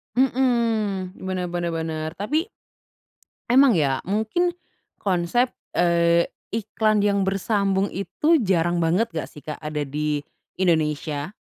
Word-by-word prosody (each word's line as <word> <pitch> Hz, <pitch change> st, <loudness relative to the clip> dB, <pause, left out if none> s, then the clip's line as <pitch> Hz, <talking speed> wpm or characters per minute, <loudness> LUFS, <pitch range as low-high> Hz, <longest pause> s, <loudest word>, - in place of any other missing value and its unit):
Mhm, 230 Hz, -7 st, +1 dB
bener 185 Hz, -1 st, -2 dB
bener 175 Hz, -1 st, -2 dB
bener 160 Hz, -1 st, -3 dB
tapi 295 Hz, -, -1 dB, 1.1 s
emang 265 Hz, -3 st, +6 dB
ya 140 Hz, -5 st, +1 dB
mungkin 220 Hz, -, 0 dB, 0.4 s
konsep, 195 Hz, +6 st, +1 dB, 0.2 s
eee, 170 Hz, -1 st, +4 dB, 0.3 s
iklan 215 Hz, -1 st, +1 dB
yang 200 Hz, -1 st, +2 dB
bersambung 195 Hz, 0 st, +1 dB
itu 300 Hz, -, +1 dB
jarang 175 Hz, -2 st, +2 dB
banget 175 Hz, +8 st, +2 dB
nggak 160 Hz, -2 st, -4 dB
sih, 150 Hz, -, -13 dB
Kak, 150 Hz, -, -5 dB
ada 150 Hz, -1 st, -3 dB
di 150 Hz, +1 st, -2 dB, 0.3 s
Indonesia? 155 Hz, -2 st, 0 dB
185 Hz, 115 wpm, -23 LUFS, 165-220 Hz, 1.1 s, emang